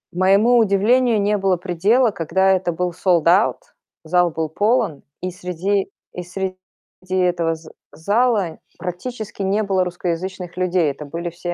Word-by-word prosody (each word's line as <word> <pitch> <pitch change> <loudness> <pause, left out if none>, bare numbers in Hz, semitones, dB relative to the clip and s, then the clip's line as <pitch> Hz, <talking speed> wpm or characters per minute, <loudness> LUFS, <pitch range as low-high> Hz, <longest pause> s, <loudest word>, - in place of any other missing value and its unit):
Моему 200 +6 +4
удивлению 225 +3 +3
не 205 +1 +1
было 190 -2 +1
предела, 200 +8 +2
когда 190 +2 +1
это 185 -2 +1
был 180 +1 -2
sold 175 -2 +1
out. 190 +6 +3 0.4
Зал 175 +2 +2
был 160 0 -3
полон, 205 - +1 0.2
и 185 0 -3
среди 185 +2 -2 0.2
и 180 - -5
среди 185 +1 -4 0.6
этого 175 -3 +1
з 160 0 -14 0.2
зала 205 -1 0 0.2
практически 205 +4 -6
не 200 +3 +1
было 190 -2 +1
русскоязычных 180 +1 -4
людей. 180 -4 +1
Это 150 +2 -9
были 170 +4 -5
все 175 +1 -5
185 Hz, 145 wpm, -20 LUFS, 175-200 Hz, 0.6 s, Моему